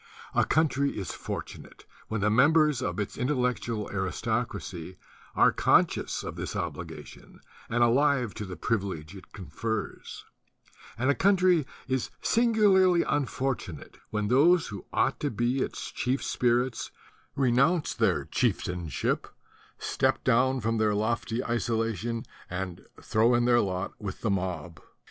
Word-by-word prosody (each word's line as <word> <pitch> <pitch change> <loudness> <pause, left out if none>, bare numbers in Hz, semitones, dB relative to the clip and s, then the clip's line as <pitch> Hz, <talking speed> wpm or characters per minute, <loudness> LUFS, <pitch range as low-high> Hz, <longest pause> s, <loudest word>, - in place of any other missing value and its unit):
A - - +3
country 140 -3 +1
is 95 - -4
fortunate - - -7 0.2
when 110 -2 -2
the 105 +1 +2
members 150 +3 +4
of 130 - -2
its 105 - -4
intellectual 125 -5 -1
aristocracy 95 -3 -3 0.4
are - - +5
conscious - - +2
of - - -6
this - - -5
obligation - - -7 0.3
and 120 +1 +2
alive 125 -1 +3
to 105 - -6
the 95 -1 -7
privilege 95 -3 -3
it 95 - -13
confers; 105 +5 -5 0.7
and 130 +4 +2
a - - +3
country 185 -4 +3 0.2
is 130 -1 -1
singularly 200 -7 +4
unfortunate 135 - -3
when 105 -1 -1
those 160 +9 +4
who 100 -4 -8
ought - - +1
to 145 - -1
be 120 +3 0
its - - -3
chief 130 +2 -1
spirits 125 0 0 0.5
renounce 140 +6 +2
their - - +1
chieftainship, 90 -3 -1 0.5
step - - 0
down 130 +2 +3
from 115 +1 0
their 105 -1 +2
lofty 115 +2 -1
isolation, 115 -1 -1 0.2
and 90 -1 -5
throw 115 +3 +2
in 120 0 +2
their 120 -1 +5
lot 95 -1 -3
with 100 -3 -6
the 110 - 0
mob. 90 -3 -3
120 Hz, 130 wpm, -28 LUFS, 105-135 Hz, 0.7 s, are